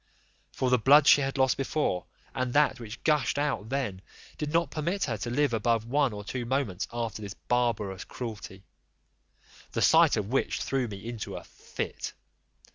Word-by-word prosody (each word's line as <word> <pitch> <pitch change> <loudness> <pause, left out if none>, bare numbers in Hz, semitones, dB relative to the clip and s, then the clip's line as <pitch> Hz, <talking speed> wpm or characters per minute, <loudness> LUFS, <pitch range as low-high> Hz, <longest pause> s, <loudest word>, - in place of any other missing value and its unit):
For 130 -1 -1
the 125 - +4
blood 140 +5 +6
she 145 - +7
had 135 0 -2
lost 130 -1 +3
before, 135 - -1 0.3
and 130 -2 -2
that 145 -3 +3
which 115 0 -9
gushed 150 -3 +2
out 145 -7 -1
then, 125 -9 -2 0.4
did 150 -1 -2
not 170 +1 +1
permit 170 +6 -1
her 120 - -1
to 105 - -4
live 140 +1 +1
above 115 0 +1
one 140 +2 +2
or 105 -1 -7
two 125 +4 -4
moments 120 -7 -1
after 115 -3 -3
this 100 -1 -7
barbarous 115 -6 -1
cruelty; 100 -5 -7 1.1
the - - -1
sight - - +6
of 100 - -2
which 135 +2 0
threw 135 -2 0
me 100 0 -8
into 120 -3 -5
a - - -7
fit. - - -6
125 Hz, 175 wpm, -28 LUFS, 110-140 Hz, 1.1 s, she